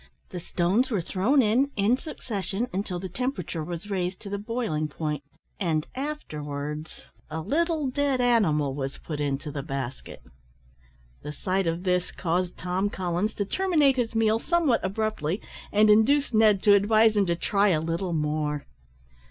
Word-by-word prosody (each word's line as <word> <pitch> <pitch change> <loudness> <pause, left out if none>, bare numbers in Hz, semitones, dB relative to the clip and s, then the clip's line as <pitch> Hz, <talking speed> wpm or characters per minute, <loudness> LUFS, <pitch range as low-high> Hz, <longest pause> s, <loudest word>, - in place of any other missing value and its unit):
The 180 - -5
stones 185 +8 +1
were 215 -6 0
thrown 215 - +2
in 240 +6 +3
in 205 +4 +3
succession, 225 - -4 0.2
till 185 -3 -4
the 190 - -5
temperature 185 - -3
was 175 +5 -6
raised 185 -1 -2
to 200 - -8
the 200 - -2
boiling 210 -9 -2
point, 150 -1 -4 0.4
and 160 -6 0
afterwards 150 - -5 0.2
a 160 +1 -4
little 310 - 0
dead 275 0 0
animal 185 - +2
was 135 0 -4
put 150 -3 -6
into 145 +1 -2
the 140 - -4
basket. 135 -3 -6 1.0
The 150 - -6
sight 185 +3 -1
of 165 +2 -1
this 180 -1 0
caused 175 +1 -1
Tom 185 +3 -1
Collins 185 +3 -2
to 205 - -1
terminate 305 - +2
his 230 -2 -1
meal 225 0 +3
somewhat 325 -5 +2
abruptly, 195 -3 -1 0.3
and 210 +1 +5
induced 240 +6 +4
Ned 215 -3 +4
to 205 - +7
advise 215 +2 +4
him 200 -2 +3
to 170 - +1
try 200 +4 +2
a 170 -6 +3
little 170 +3 -2
more. 150 -1 -1
195 Hz, 160 wpm, -26 LUFS, 160-225 Hz, 1.0 s, to